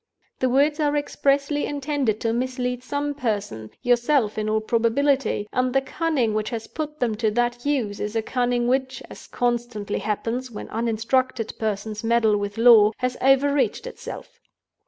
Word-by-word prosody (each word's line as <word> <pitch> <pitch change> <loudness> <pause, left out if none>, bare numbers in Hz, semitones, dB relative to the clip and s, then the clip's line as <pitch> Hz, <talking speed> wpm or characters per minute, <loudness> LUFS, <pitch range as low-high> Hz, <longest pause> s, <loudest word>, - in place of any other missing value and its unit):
The 255 - +2
words 290 +4 +2
are 295 -1 +1
expressly 285 0 0
intended 280 -6 -1
to 225 -1 0
mislead 250 0 -2
some 285 +2 -2
person—yourself 235 - 0
in 215 0 -2
all 215 0 +2
probability—and 245 +1 +1
the 270 - +3
cunning 270 -6 0
which 215 0 -1
has 230 -2 -4
put 305 -1 -6
them 240 -3 +1
to 220 -1 +1
that 240 +3 -1
use 235 -9 -1
is 210 +2 -4
a 225 - 0
cunning 245 0 0
which 260 +1 -1
(as - - -11
constantly 240 -4 -2
happens 225 +5 -2
when 220 - -8
uninstructed 230 +1 -1
persons 215 0 -3
meddle 225 -2 +3
with 205 +1 -4
law) 225 -2 +7
has 250 0 -1
overreached 275 - +2
itself. - - -9
245 Hz, 150 wpm, -23 LUFS, 220-270 Hz, -, law